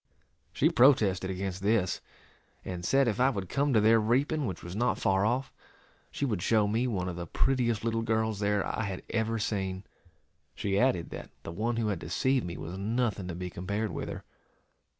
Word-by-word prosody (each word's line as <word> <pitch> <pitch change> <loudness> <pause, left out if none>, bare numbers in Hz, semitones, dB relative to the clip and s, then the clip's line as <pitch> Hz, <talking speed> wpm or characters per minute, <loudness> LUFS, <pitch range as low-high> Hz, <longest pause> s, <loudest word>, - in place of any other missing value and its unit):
She - - +2
protested 105 -8 +4
against 95 0 -3
this, 100 -3 +1 0.6
and 90 -2 -5
said 135 +7 +3
if 110 -1 0
I 130 +1 +5
would 100 -8 -4
come 140 +4 +1
to 115 - +5
their 110 +2 +5
reaping, 135 +6 +1
which 90 -4 -5
was 85 +2 -7
not 120 +3 +1
far 95 +1 +2
off, 130 +3 -1 0.6
she 140 - -2
would 105 -9 -1
show 110 +1 +3
me 115 +5 +1
one 95 -6 -1
of 90 - -4
the 85 -1 -5
prettiest 120 - +1
little 115 0 0
girls 110 -2 0
there 105 -1 +1
I - - -2
had 95 -2 -5
ever 115 0 0
seen. 95 -3 -2 0.7
She 100 -1 0
added 125 -9 +1
that - - -7
the - - -6
one 110 +7 -1
who 115 -2 0
had 100 -5 -2
deceived 120 - 0
me 85 - -5
was 90 +4 -6
nothing 110 -2 -1
to 90 - -4
be 90 0 -5
compared 100 +5 -2
with - - -4
her. - - -6
105 Hz, 195 wpm, -29 LUFS, 95-120 Hz, 0.7 s, I